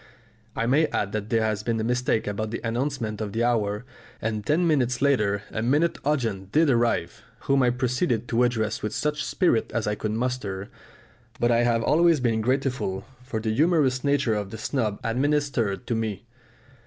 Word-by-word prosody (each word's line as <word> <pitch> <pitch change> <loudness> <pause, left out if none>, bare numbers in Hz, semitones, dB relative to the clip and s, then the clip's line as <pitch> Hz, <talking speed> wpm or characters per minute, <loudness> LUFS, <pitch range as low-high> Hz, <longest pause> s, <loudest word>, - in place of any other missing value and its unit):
I 115 - 0
may 145 +6 +3
add 100 -7 -2
that 105 0 -4
there 115 -1 +2
had 105 -1 -1
been 115 0 -1
a - - -1
mistake 125 -1 0
about 105 +1 -3
the 115 - -4
announcement 115 -2 -2
of 105 -2 -4
the 115 - 0
hour, 110 -2 0 0.3
and 110 -1 -2
ten 160 - +2
minutes 125 -6 +2
later 105 -8 +2
a 110 - -2
minute 145 +8 +1
audience 115 -10 -1
did 155 +1 +4
arrive, 120 -1 0 0.2
whom 135 0 +2
I 125 - +4
proceeded 125 0 0
to 115 +1 +2
address 115 -3 0
with 105 0 -3
such 150 -1 -1
spirit 175 - +1
as 115 - 0
I 105 - 0
could 105 0 -3
muster; 110 -5 -3 0.7
but 120 0 +2
I 115 - +4
have 115 -1 +2
always 165 +2 +4
been 115 -3 +1
grateful 125 -6 -1 0.2
for 125 -3 -3
the 110 0 -1
humorous 145 -3 +2
nature 140 -5 +2
of 105 -2 -2
the 110 - -7
snub 110 -3 -2
administered 125 -3 0
to 120 - -1
me. 110 -1 -3
120 Hz, 185 wpm, -25 LUFS, 110-135 Hz, 0.7 s, did